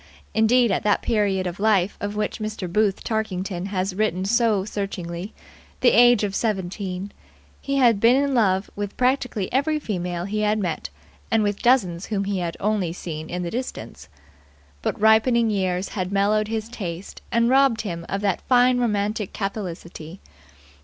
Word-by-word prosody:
Indeed, 230 Hz, +1 st, +4 dB
at -, -, +1 dB
that 205 Hz, -1 st, +1 dB
period 200 Hz, -4 st, +1 dB
of 180 Hz, +1 st, -4 dB
life 205 Hz, -2 st, +2 dB
of 205 Hz, +1 st, -3 dB
which 210 Hz, +2 st, -2 dB
Mr. 215 Hz, -3 st, -4 dB
Booth 200 Hz, +2 st, +1 dB
Tarkington 190 Hz, -4 st, -3 dB
has 190 Hz, -1 st, -2 dB
written 190 Hz, -2 st, 0 dB
so 220 Hz, -2 st, +2 dB
searchingly 195 Hz, -2 st, -5 dB, 0.5 s
the 245 Hz, -, +5 dB
age 240 Hz, -1 st, +6 dB
of 200 Hz, -2 st, -1 dB
seventeen 195 Hz, -2 st, -3 dB, 0.5 s
he 275 Hz, -, -2 dB
had 240 Hz, -6 st, +4 dB
been 230 Hz, +4 st, +5 dB
in 280 Hz, 0 st, +1 dB
love 195 Hz, -5 st, +2 dB
with 205 Hz, 0 st, -5 dB
practically 250 Hz, -6 st, 0 dB
every 305 Hz, +4 st, +1 dB
female 180 Hz, -8 st, -3 dB
he 210 Hz, +2 st, -2 dB, 0.2 s
met 185 Hz, -6 st, -3 dB, 0.4 s
and 225 Hz, -1 st, +2 dB
with 205 Hz, -1 st, -1 dB
dozens 195 Hz, -9 st, +2 dB
whom 200 Hz, -3 st, -1 dB
he 195 Hz, -1 st, -2 dB
had 170 Hz, -2 st, -3 dB
only 205 Hz, -4 st, 0 dB
seen 160 Hz, -2 st, -6 dB
in 180 Hz, 0 st, -3 dB
the 170 Hz, -, -4 dB
distance; 255 Hz, +2 st, -6 dB, 0.7 s
but -, -, -2 dB
ripening 220 Hz, +2 st, +4 dB
years 185 Hz, -2 st, -1 dB
had 185 Hz, -2 st, -3 dB
mellowed 210 Hz, +2 st, +2 dB
his 220 Hz, 0 st, -3 dB
taste 185 Hz, -6 st, -7 dB
and 235 Hz, 0 st, +3 dB
robbed 265 Hz, -3 st, +4 dB
him 170 Hz, -5 st, -5 dB
of 195 Hz, -, -2 dB
that 200 Hz, -3 st, 0 dB
fine 250 Hz, 0 st, +5 dB
romantic 210 Hz, -3 st, -1 dB
catholicity. 180 Hz, -4 st, -6 dB
205 Hz, 160 wpm, -23 LUFS, 185-225 Hz, 0.7 s, age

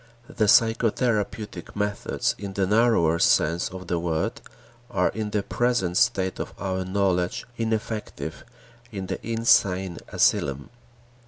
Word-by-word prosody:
The 110 Hz, -, 0 dB
psychotherapeutic 110 Hz, -3 st, +1 dB
methods 105 Hz, 0 st, -1 dB
in 100 Hz, -1 st, -6 dB
the 95 Hz, 0 st, +1 dB
narrower 105 Hz, -6 st, +3 dB
sense 85 Hz, +2 st, +3 dB
of 95 Hz, 0 st, -8 dB
the 85 Hz, -1 st, -1 dB
word 80 Hz, -2 st, -2 dB, 0.5 s
are -, -, +1 dB
in 110 Hz, -1 st, -4 dB
the 105 Hz, -1 st, -1 dB
present 120 Hz, -6 st, 0 dB
state 95 Hz, -4 st, +1 dB
of -, -, -5 dB
our 95 Hz, -1 st, -2 dB
knowledge 95 Hz, -2 st, 0 dB
ineffective 110 Hz, -1 st, -3 dB, 0.5 s
in 95 Hz, -3 st, -5 dB
the -, -, -4 dB
insane 95 Hz, -5 st, +2 dB
asylum. 70 Hz, 0 st, +1 dB
100 Hz, 120 wpm, -25 LUFS, 90-110 Hz, 0.5 s, narrower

